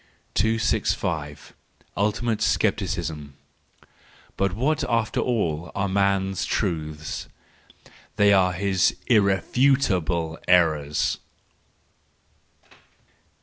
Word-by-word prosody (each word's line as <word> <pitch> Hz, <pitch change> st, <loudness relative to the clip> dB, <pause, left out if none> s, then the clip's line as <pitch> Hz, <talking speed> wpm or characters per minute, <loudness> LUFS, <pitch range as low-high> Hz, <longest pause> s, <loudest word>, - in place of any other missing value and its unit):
265. 90 Hz, -8 st, -1 dB, 0.4 s
Ultimate 110 Hz, +2 st, 0 dB
Scepticism 85 Hz, -10 st, -1 dB, 1.0 s
.—But 100 Hz, -2 st, 0 dB
what 140 Hz, +9 st, 0 dB
after 115 Hz, -2 st, 0 dB
all 85 Hz, -9 st, -1 dB
are 100 Hz, 0 st, 0 dB
man's 95 Hz, -1 st, 0 dB
truths 80 Hz, -5 st, -3 dB, 0.9 s
?—They 100 Hz, 0 st, +5 dB
are 90 Hz, -2 st, +3 dB
his 95 Hz, 0 st, +1 dB
irrefutable 95 Hz, -, +2 dB
errors. 80 Hz, -5 st, +2 dB
95 Hz, 65 wpm, -24 LUFS, 80-105 Hz, 1.0 s, They